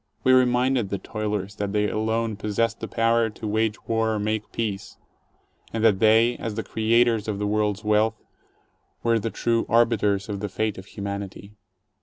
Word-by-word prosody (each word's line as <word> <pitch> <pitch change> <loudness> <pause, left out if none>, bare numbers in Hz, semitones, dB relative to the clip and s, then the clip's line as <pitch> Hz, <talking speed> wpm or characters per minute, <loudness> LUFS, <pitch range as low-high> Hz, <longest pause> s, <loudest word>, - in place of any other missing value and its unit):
We 130 - +5
reminded 125 -2 +3
the 100 - -2
toilers 105 -2 -4
that 100 -1 -3
they 105 0 +2
alone 110 +1 -1
possessed 115 +2 -1
the 115 - -5
power 115 0 +2
to 110 +1 -7
wage 110 +1 -1
war 115 -1 +1
or - - -2
make 110 +1 -2
peace, 105 -4 -4 0.8
and 110 -1 -2
that 105 -4 +4
they 115 +3 +4
— - - -27
as 110 -2 -4
the 110 - -3
creators 115 0 +2
of 105 -2 -2
the 105 - -2
world's 105 0 0
wealth 110 +1 +2 0.4
— - - -43
were 115 -1 +3
the 115 - -2
true 115 +1 0
arbiters 105 -4 +2
of 100 -2 -4
the 105 0 -4
fate 110 +1 -2
of 95 - -12
humanity. 100 0 -6
110 Hz, 185 wpm, -24 LUFS, 105-115 Hz, 0.8 s, We